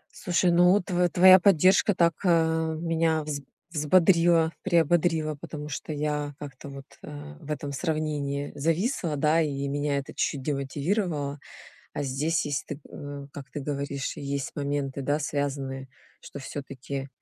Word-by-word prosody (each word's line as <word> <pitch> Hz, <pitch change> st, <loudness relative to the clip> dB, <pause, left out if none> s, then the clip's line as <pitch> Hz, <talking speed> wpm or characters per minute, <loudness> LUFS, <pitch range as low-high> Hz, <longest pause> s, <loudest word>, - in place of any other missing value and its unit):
Слушай, 180 Hz, -1 st, +1 dB
ну, 180 Hz, +3 st, +5 dB
тв 180 Hz, -1 st, +1 dB
твоя 185 Hz, +2 st, +8 dB
поддержка 190 Hz, +2 st, +4 dB
так, 170 Hz, -1 st, +3 dB
э, 160 Hz, -2 st, +2 dB
меня 165 Hz, -1 st, +1 dB
вз 150 Hz, -1 st, -4 dB, 0.3 s
взбодрила, 165 Hz, +1 st, +4 dB
приободрила, 165 Hz, -2 st, +2 dB
потому 150 Hz, 0 st, -8 dB
что 150 Hz, -, -5 dB
я 150 Hz, -1 st, -2 dB
как-то 140 Hz, -1 st, -9 dB
вот, 140 Hz, 0 st, -9 dB, 0.2 s
э, 75 Hz, 0 st, -9 dB
в -, -, -13 dB
этом 145 Hz, -1 st, -3 dB
сравнении 145 Hz, -1 st, -2 dB
зависла, 165 Hz, -, 0 dB
да, 155 Hz, +3 st, +3 dB
и 140 Hz, -3 st, -2 dB
меня 145 Hz, 0 st, -1 dB
это 140 Hz, -, -5 dB
чуть-чуть 135 Hz, -2 st, -1 dB
демотивировало. 145 Hz, +2 st, -2 dB, 0.5 s
А -, -, -3 dB
здесь, 145 Hz, +4 st, 0 dB
если 145 Hz, +1 st, -3 dB
ты 145 Hz, -, -14 dB
э, 145 Hz, -1 st, -7 dB
как 140 Hz, -1 st, -9 dB
ты 150 Hz, -, -4 dB
говоришь, 140 Hz, -1 st, -3 dB
есть 140 Hz, -1 st, -3 dB
моменты, 140 Hz, -1 st, -2 dB
да, 145 Hz, +3 st, 0 dB
связанные, 135 Hz, -2 st, -3 dB, 0.3 s
что 140 Hz, -, -9 dB
всё-таки 135 Hz, 0 st, -6 dB
150 Hz, 145 wpm, -27 LUFS, 140-165 Hz, 0.5 s, твоя